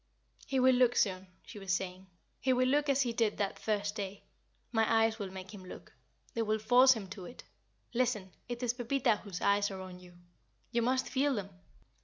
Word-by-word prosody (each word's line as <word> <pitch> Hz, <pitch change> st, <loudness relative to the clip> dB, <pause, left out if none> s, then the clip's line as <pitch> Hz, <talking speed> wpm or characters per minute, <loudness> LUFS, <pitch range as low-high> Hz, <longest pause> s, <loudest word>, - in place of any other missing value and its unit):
"He 270 Hz, -1 st, +1 dB
will 260 Hz, 0 st, +6 dB
look 245 Hz, -1 st, +4 dB
soon," 190 Hz, -2 st, +1 dB, 0.2 s
she 210 Hz, -, -10 dB
was 195 Hz, -2 st, -4 dB
saying. 185 Hz, +1 st, -2 dB, 0.3 s
"He 260 Hz, -1 st, +2 dB
will 255 Hz, 0 st, +3 dB
look 290 Hz, +2 st, +2 dB
as 275 Hz, 0 st, +3 dB
he 240 Hz, -2 st, -2 dB
did 225 Hz, -3 st, +1 dB
that 200 Hz, -1 st, -2 dB
first 205 Hz, -1 st, -1 dB
day. 200 Hz, -2 st, -6 dB, 0.5 s
My 225 Hz, -2 st, +2 dB
eyes 225 Hz, 0 st, -2 dB
will 200 Hz, -2 st, -4 dB
make 190 Hz, +1 st, -9 dB
him 195 Hz, -2 st, -10 dB
look. 185 Hz, -, -11 dB, 0.4 s
They 230 Hz, -, -1 dB
will 215 Hz, -1 st, +1 dB
force 245 Hz, +4 st, +6 dB
him 215 Hz, -5 st, -6 dB
to 190 Hz, -1 st, -8 dB
it. 245 Hz, -, -11 dB, 0.5 s
Listen! 230 Hz, -6 st, 0 dB, 0.2 s
it 240 Hz, +1 st, -4 dB
is 240 Hz, -1 st, +1 dB
Pepita 245 Hz, -1 st, +1 dB
whose 200 Hz, -4 st, -7 dB
eyes 200 Hz, 0 st, +3 dB
are 190 Hz, -1 st, -6 dB
on 185 Hz, -1 st, -9 dB
you. 180 Hz, -1 st, -15 dB, 0.6 s
You 235 Hz, 0 st, +1 dB
must 255 Hz, +2 st, +1 dB
feel 275 Hz, +1 st, +1 dB
them. 200 Hz, -2 st, -4 dB
220 Hz, 205 wpm, -32 LUFS, 195-250 Hz, 0.6 s, will